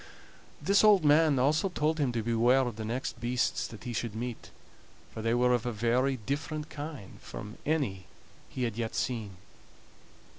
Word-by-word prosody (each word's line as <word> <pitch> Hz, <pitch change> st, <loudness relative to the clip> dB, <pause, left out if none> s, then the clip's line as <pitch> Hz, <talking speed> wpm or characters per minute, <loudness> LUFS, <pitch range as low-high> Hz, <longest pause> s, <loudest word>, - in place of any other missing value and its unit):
This 200 Hz, +2 st, +3 dB
old 205 Hz, -6 st, +6 dB
man 150 Hz, -1 st, +5 dB
also 155 Hz, +8 st, +2 dB
told 155 Hz, -2 st, 0 dB
him 140 Hz, -4 st, +2 dB
to 115 Hz, -2 st, -1 dB
beware 120 Hz, +3 st, +3 dB
of 120 Hz, -4 st, -2 dB
the 110 Hz, -, -5 dB
next 120 Hz, +2 st, -4 dB
beasts 120 Hz, +1 st, 0 dB
that 110 Hz, -, -11 dB
he 120 Hz, -2 st, -4 dB
should 115 Hz, -1 st, -3 dB
meet, 120 Hz, 0 st, -5 dB, 0.6 s
for 110 Hz, -, -5 dB
they 115 Hz, +1 st, +1 dB
were 125 Hz, 0 st, +3 dB
of 120 Hz, -2 st, +1 dB
a -, -, 0 dB
very 120 Hz, +5 st, +1 dB
different 150 Hz, +5 st, -4 dB
kind 145 Hz, -, -8 dB
from 105 Hz, +1 st, -8 dB
any 130 Hz, -, -1 dB, 0.4 s
he 130 Hz, -, -4 dB
had 115 Hz, -3 st, -2 dB
yet 115 Hz, -1 st, -3 dB
seen. 105 Hz, -3 st, -2 dB
125 Hz, 175 wpm, -30 LUFS, 115-145 Hz, 0.6 s, old